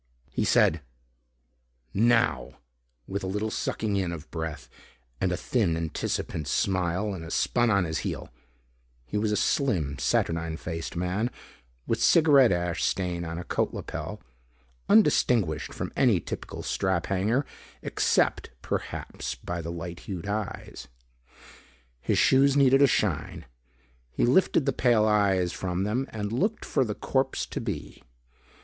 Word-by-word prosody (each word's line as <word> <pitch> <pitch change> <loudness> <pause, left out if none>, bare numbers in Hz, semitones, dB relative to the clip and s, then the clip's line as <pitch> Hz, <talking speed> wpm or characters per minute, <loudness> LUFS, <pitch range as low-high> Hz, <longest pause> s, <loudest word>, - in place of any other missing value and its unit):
He - - -1
said 80 0 +3 1.1
"Now" 115 +2 +2 0.5
with 100 +5 -4
a - - -2
little 105 +3 -2
sucking 105 -2 -1
in 90 -3 -1
of 85 -1 -8
breath 80 -3 -5 0.5
and 95 - +1
a 90 - 0
thin 100 -8 0
anticipant 80 -1 -3
smile 95 +2 0
and 85 -2 -7
spun 120 -1 +2
on 100 -3 +3
his 80 -2 -2
heel. - - -4 0.8
He 105 - -2
was 105 0 0
a 105 - +1
slim 85 - 0
saturnine 80 -1 0
faced 80 0 -5
man 90 +7 -1 0.6
with 115 0 -1
cigaret 145 - +6
ash 85 -1 -1
stain 90 -2 -1
on 85 0 -5
a 90 - -5
coat - - -1
lapel. - - -6 0.7
Undistinguished 115 - +3
from - - -5
any - - +4
typical - - -6
strap 95 -3 0
hanger 105 +8 +1 0.4
except - - +1
perhaps - - -4
by 85 -1 -5
the 85 +1 -5
light 85 0 -6
hued 95 -1 -4
eyes. 105 -1 -5 1.1
His - - 0
shoes 135 +1 +4
needed 135 0 +5
a 140 - +7
shine. 85 - -1 0.6
He - - 0
lifted 140 +2 +3
the 135 - +1
pale 120 -4 +3
eyes 100 -4 +2
from 90 0 -2
them 120 +7 -1
and 105 -1 -4
looked 205 - -1
for 135 - +1
the 105 -4 -3
corpse 135 0 -1
to - - -5
be. - - -5
95 Hz, 140 wpm, -27 LUFS, 85-120 Hz, 1.1 s, a